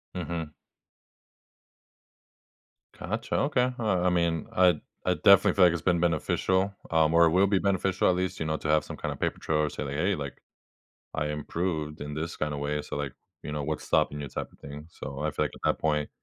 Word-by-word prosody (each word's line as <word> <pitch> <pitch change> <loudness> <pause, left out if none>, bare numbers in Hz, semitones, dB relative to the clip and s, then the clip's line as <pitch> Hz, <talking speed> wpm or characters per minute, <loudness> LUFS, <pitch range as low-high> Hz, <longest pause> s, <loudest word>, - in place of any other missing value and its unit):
Mhm. 85 -3 -4 2.5
Gotcha. - - -3
Okay, 130 -3 +2
well, 100 -6 +1
I - - +5
mean, 85 -2 0
I 90 -4 +5 0.3
I - - +3
definitely - - +6
feel 95 - +6
like 85 - +4
it's 85 - -3
been 90 -2 +2
beneficial, 95 +4 +1 0.2
um, 80 -1 +3
or 85 0 +7
it 80 - +3
will 95 +3 +4
be 100 0 +2
beneficial 95 -1 +1
at 90 - +3
least, 90 0 -2
you 80 - -2
know, 80 0 -1
to 80 - -5
have 75 0 +3
some - - -8
kinda - - -3
paper - - -2
trail 80 - 0
or 75 -1 +1
say, - - -4
like, 70 -1 -4
"Hey, 90 +7 +1
like, 70 -3 -7 0.7
I 75 - -1
improved 75 0 -3
in 75 0 -5
this 80 +2 -4
kinda 75 -1 -2
way, 75 +1 -2
so, - - -7
like" 70 -3 -3 0.3
you - - -5
know, 75 -1 -2
what's 75 +1 -3
stopping 75 - +1
you 70 - -5
type 65 - -5
of - - -23
thing. 70 +2 -9
So 70 -3 -7
I 75 +1 -1
feel 75 - 0
like - - -3
at - - -15
that - - -10
point, 75 -2 0
80 Hz, 215 wpm, -28 LUFS, 75-90 Hz, 2.5 s, or